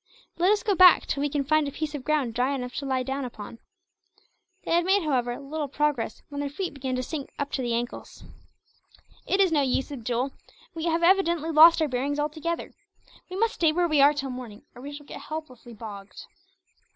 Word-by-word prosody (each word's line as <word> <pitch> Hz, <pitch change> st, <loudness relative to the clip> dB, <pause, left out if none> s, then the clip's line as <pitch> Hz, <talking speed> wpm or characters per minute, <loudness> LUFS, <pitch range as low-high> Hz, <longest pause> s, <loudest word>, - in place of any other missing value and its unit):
Let 360 Hz, +2 st, +4 dB
us 420 Hz, -, +1 dB
go 425 Hz, -4 st, +2 dB
back, 365 Hz, -1 st, +7 dB
till 280 Hz, -, -2 dB
we 290 Hz, -, 0 dB
can 285 Hz, -1 st, -1 dB
find 310 Hz, +1 st, +2 dB
a -, -, -4 dB
piece 310 Hz, +1 st, -4 dB
of 285 Hz, -3 st, -5 dB
ground 290 Hz, -6 st, 0 dB
dry 255 Hz, +4 st, 0 dB
enough 250 Hz, -2 st, -5 dB
to 280 Hz, -, -3 dB
lie 260 Hz, -1 st, 0 dB
down 270 Hz, +2 st, -3 dB
upon." 230 Hz, -2 st, -8 dB, 1.0 s
They -, -, -5 dB
had 340 Hz, +1 st, +4 dB
made, 385 Hz, +1 st, +2 dB
however, 245 Hz, -5 st, -1 dB
little 290 Hz, +1 st, -4 dB
progress 280 Hz, -5 st, -1 dB
when 285 Hz, 0 st, -4 dB
their 285 Hz, -, -2 dB
feet 345 Hz, +3 st, -4 dB
began 265 Hz, -2 st, -3 dB
to 255 Hz, -, -2 dB
sink 285 Hz, +1 st, -5 dB
up 285 Hz, 0 st, -3 dB
to 265 Hz, -, -2 dB
the 240 Hz, -2 st, -1 dB
ankles. 240 Hz, +1 st, -5 dB, 1.0 s
"It 385 Hz, -, +1 dB
is 380 Hz, -3 st, +4 dB
no 300 Hz, -3 st, +3 dB
use, 265 Hz, +1 st, 0 dB
Abdool. 250 Hz, 0 st, -2 dB, 0.4 s
We 325 Hz, -1 st, -4 dB
have 335 Hz, 0 st, 0 dB
evidently 340 Hz, -3 st, +3 dB
lost 320 Hz, +1 st, +7 dB
our -, -, +1 dB
bearings, 275 Hz, +2 st, -2 dB
altogether. 310 Hz, +3 st, -3 dB, 0.6 s
We 365 Hz, -, -6 dB
must 455 Hz, +2 st, +1 dB
stay 325 Hz, -2 st, +2 dB
where 350 Hz, +2 st, +1 dB
we 305 Hz, -3 st, +3 dB
are 285 Hz, +1 st, +7 dB
till 275 Hz, -2 st, -3 dB
morning, 245 Hz, -5 st, -9 dB
or 245 Hz, -, -12 dB
we 285 Hz, +2 st, -7 dB
shall 290 Hz, 0 st, -10 dB
get -, -, -9 dB
helplessly 255 Hz, -7 st, -8 dB
bogged." 205 Hz, -2 st, -9 dB
285 Hz, 210 wpm, -26 LUFS, 255-320 Hz, 1.0 s, back